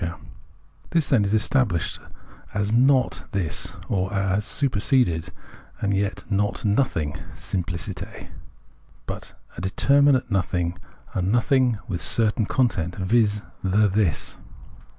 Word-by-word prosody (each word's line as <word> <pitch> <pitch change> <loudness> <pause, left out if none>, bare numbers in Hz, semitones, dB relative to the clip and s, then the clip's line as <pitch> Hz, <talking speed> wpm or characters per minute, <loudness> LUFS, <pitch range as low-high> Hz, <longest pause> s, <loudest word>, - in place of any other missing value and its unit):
The 85 0 -3 0.7
This, 165 -4 +1
then, 120 -7 +4
is 100 - -1
estabhshed 110 - +1 0.6
as 105 0 0
not 130 +2 +3
This, 90 0 -2
or 95 -3 -1
as 95 +1 0
super 130 -3 0
seded, 90 - +2 0.5
and 100 -1 0
yet 100 +2 -1
not 105 +1 -1
nothing 85 - +1 0.2
{simfliciter), 85 -3 -5 0.8
but - - -7 0.2
a - - -5
deter 140 +9 +3
minate 140 -3 +4
nothing, 90 -2 0 0.3
a 95 - 0
nothing 120 +4 +2
with 90 -4 -3
a - - -1
certain 110 -1 +2
content, 90 -10 0
viz. 105 +1 +2 0.2
the 100 +3 +3
This. 95 -6 0
100 Hz, 125 wpm, -24 LUFS, 90-120 Hz, 0.8 s, then